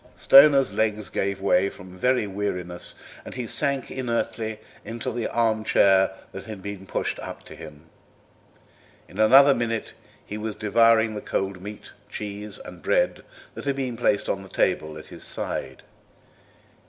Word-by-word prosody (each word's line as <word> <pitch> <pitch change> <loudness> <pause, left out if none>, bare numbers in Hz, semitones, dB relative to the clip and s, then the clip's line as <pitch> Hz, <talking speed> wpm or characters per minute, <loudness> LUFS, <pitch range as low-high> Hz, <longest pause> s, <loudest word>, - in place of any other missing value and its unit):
Stoner's 140 -1 +7
legs 105 -1 -1
gave 100 0 -2
way 100 0 +3
from 90 -1 -13
very 125 +4 +1
weariness, 90 -3 -4 0.3
and - - -9
he 125 -2 -3
sank 140 +4 -1
inertly 115 -3 -2 0.3
into 115 0 -5
the 120 -1 -2
arm 110 -2 +1
chair 95 -2 +4 0.2
that 95 - -8
had 105 -4 -8
been 100 -1 -7
pushed - - -2
up - - -8
to - - -11
him. 75 0 -12 1.2
In 95 - -12
another 135 +6 +7
minute 115 -3 -2 0.3
he 105 - -6
was 110 0 -4
devouring 110 +1 +3
the 105 - -5
cold 95 -1 -3
meat, 105 +2 -9 0.2
cheese, 105 0 -6
and - - -11
bread, - - +1 0.3
that - - -8
had 140 -1 0
been 130 -3 -3
placed 105 -3 +1
on 95 - -1
the 95 - -12
table 80 -5 0
at 80 - -10
his - - -10
side. 65 -1 -5
105 Hz, 155 wpm, -25 LUFS, 95-115 Hz, 1.2 s, Stoner's